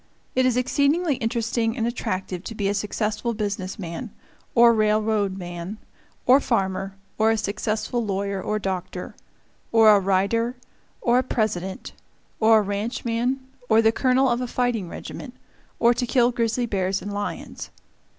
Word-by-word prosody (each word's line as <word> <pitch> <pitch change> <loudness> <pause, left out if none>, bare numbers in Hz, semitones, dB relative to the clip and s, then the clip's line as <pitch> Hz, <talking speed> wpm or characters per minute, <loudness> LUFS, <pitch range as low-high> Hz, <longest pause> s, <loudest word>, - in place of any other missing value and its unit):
It 255 0 +3
is 250 -1 +1
exceedingly 285 +4 +2
interesting 225 +1 -1
and 225 - 0
attractive 185 -6 -3
to 225 - -6
be 205 -2 -1
a 200 - +1
successful 210 +3 -2
business 200 -3 -3
man, 190 +5 -6 0.5
or 235 0 +7
railroad 215 -2 +1
man, 175 +2 -6 0.5
or 260 +2 +7
farmer, 195 -6 -1 0.2
or 220 +1 +4
a 225 - +2
successful 215 +3 -2
lawyer 200 -1 -2
or 215 - -1
doctor; 185 -2 -4 0.6
or 225 -1 +7
a - - +4
writer, 200 +6 +1 0.5
or 240 +1 +3
a - - +1
President, 195 -7 -2 0.5
or 220 0 +6
a - - +4
ranchman, 230 +5 -1 0.3
or 220 0 +5
the 225 0 +5
colonel 260 +2 +3
of 240 0 +1
a 250 - -2
fighting 240 -7 -1
regiment, - - -8 0.4
or 235 +1 +5
to 245 0 -2
kill 245 0 +3
grizzly 235 0 0
bears 195 -3 -1
and 205 - -5
lions. 205 0 -5
220 Hz, 150 wpm, -24 LUFS, 200-240 Hz, 0.6 s, or